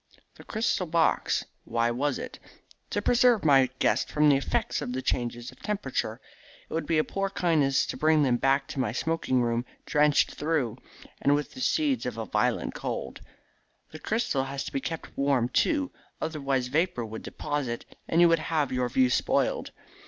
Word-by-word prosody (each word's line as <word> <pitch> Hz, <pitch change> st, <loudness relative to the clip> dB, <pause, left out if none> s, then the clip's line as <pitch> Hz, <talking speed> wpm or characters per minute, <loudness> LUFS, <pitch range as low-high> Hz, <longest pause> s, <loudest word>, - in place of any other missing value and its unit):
"The -, -, -14 dB
crystal 215 Hz, -4 st, -1 dB
box? 165 Hz, 0 st, +1 dB, 0.2 s
Why 115 Hz, 0 st, 0 dB
was 135 Hz, +3 st, 0 dB
it?" -, -, -7 dB, 0.5 s
"To 205 Hz, -, -2 dB
preserve 240 Hz, -5 st, +4 dB
my 135 Hz, -3 st, +5 dB
guests -, -, +1 dB
from 150 Hz, 0 st, +4 dB
the 140 Hz, -, +6 dB
effects 135 Hz, -, -1 dB
of 125 Hz, -, -4 dB
the 130 Hz, -, -2 dB
changes 120 Hz, 0 st, -2 dB
of -, -, -19 dB
temperature. 135 Hz, -, -2 dB, 0.5 s
It -, -, -10 dB
would 165 Hz, -, -2 dB
be 165 Hz, -, +2 dB
a 155 Hz, -, +4 dB
poor 195 Hz, +3 st, -2 dB
kindness 155 Hz, -8 st, +2 dB
to -, -, -5 dB
bring 155 Hz, -1 st, +4 dB
them 125 Hz, -3 st, +2 dB
back 135 Hz, +2 st, +2 dB
to -, -, -5 dB
my 120 Hz, -5 st, 0 dB
smoking 130 Hz, -3 st, 0 dB
room 120 Hz, 0 st, 0 dB, 0.2 s
drenched 150 Hz, 0 st, +3 dB
through, 145 Hz, -7 st, -1 dB, 0.4 s
and 140 Hz, +1 st, +4 dB
with 145 Hz, 0 st, -3 dB
the 260 Hz, -, -8 dB
seeds 275 Hz, -, +1 dB
of 120 Hz, -3 st, -4 dB
a 115 Hz, -, -3 dB
violent -, -, 0 dB
cold. -, -, -5 dB, 0.7 s
The 155 Hz, -, -9 dB
crystal 180 Hz, -, 0 dB
has 135 Hz, 0 st, -4 dB
to -, -, -6 dB
be 135 Hz, -, -1 dB
kept 165 Hz, +2 st, -6 dB
warm, 135 Hz, -4 st, +1 dB
too, 285 Hz, -, +1 dB, 0.3 s
otherwise 140 Hz, -5 st, -1 dB
vapour 155 Hz, -4 st, 0 dB
would 110 Hz, 0 st, -7 dB
deposit, 140 Hz, -5 st, -4 dB, 0.2 s
and 165 Hz, -, +3 dB
you 175 Hz, -, +8 dB
would 165 Hz, -1 st, +3 dB
have 155 Hz, -3 st, -1 dB
your 125 Hz, -1 st, 0 dB
view 130 Hz, 0 st, +3 dB
spoiled. -, -, +1 dB
145 Hz, 180 wpm, -27 LUFS, 125-165 Hz, 0.7 s, you